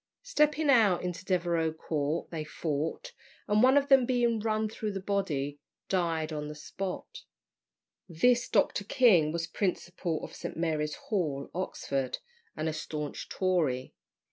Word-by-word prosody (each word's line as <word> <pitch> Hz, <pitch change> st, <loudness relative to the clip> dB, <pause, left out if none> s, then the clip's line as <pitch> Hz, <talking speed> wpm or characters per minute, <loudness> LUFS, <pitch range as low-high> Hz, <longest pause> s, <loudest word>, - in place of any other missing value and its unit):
Stepping 300 Hz, -10 st, +2 dB
out 220 Hz, -10 st, +5 dB
into 180 Hz, 0 st, -4 dB
Devereux 170 Hz, -3 st, +1 dB
Court, 155 Hz, 0 st, -2 dB
they 160 Hz, -2 st, -3 dB
fought, 155 Hz, 0 st, -3 dB, 0.3 s
and 210 Hz, +1 st, +3 dB
one 260 Hz, +3 st, +6 dB
of 280 Hz, 0 st, +3 dB
them 270 Hz, -2 st, +6 dB
being 240 Hz, -3 st, +2 dB
run 215 Hz, 0 st, 0 dB
through 215 Hz, 0 st, -4 dB
the 195 Hz, -, -4 dB
body, 155 Hz, -8 st, -1 dB, 0.3 s
died 165 Hz, -4 st, 0 dB
on 150 Hz, -1 st, -3 dB
the 150 Hz, -, -7 dB
spot. 185 Hz, +5 st, -6 dB, 0.9 s
This 240 Hz, +9 st, +3 dB
Dr. 205 Hz, -1 st, +2 dB
King 195 Hz, -9 st, +4 dB
was 165 Hz, 0 st, -2 dB
principal 175 Hz, -2 st, -2 dB
of -, -, -7 dB
St. -, -, -6 dB
Mary's 155 Hz, -2 st, -1 dB
Hall, 150 Hz, -10 st, -2 dB
Oxford, 140 Hz, -7 st, -2 dB, 0.4 s
and 155 Hz, -, -1 dB
a 160 Hz, -, -1 dB
staunch 150 Hz, -1 st, -5 dB
Tory. 160 Hz, -9 st, 0 dB
175 Hz, 140 wpm, -30 LUFS, 155-215 Hz, 0.9 s, one